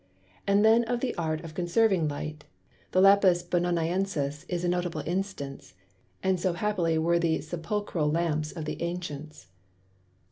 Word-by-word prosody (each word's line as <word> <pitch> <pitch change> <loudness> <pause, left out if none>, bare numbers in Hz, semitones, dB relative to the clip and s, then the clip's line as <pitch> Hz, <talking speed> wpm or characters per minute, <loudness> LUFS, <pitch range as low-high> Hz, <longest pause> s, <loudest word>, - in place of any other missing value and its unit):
And 200 +2 +4
then 225 +2 +6
of 240 +1 -1
the 250 0 -1
Art 160 -2 -2
of 160 - -8
Conserving 180 0 +2
Light, 150 +1 -5 0.5
the 185 - +3
Lapis 195 -3 +5
Bononiensis 175 -3 -1
is 175 -1 -2
a - - +1
notable 175 -3 -1
Instance; 175 - -4 0.5
and 190 -1 +2
so 180 0 0
happily 175 -4 0
were 170 +2 +2
the 165 -2 +1
Sepulchral 170 0 -2
Lamps 155 -1 0
of 160 -3 -6
the - - -5
Ancients. 155 - -5
170 Hz, 145 wpm, -28 LUFS, 155-190 Hz, 0.5 s, then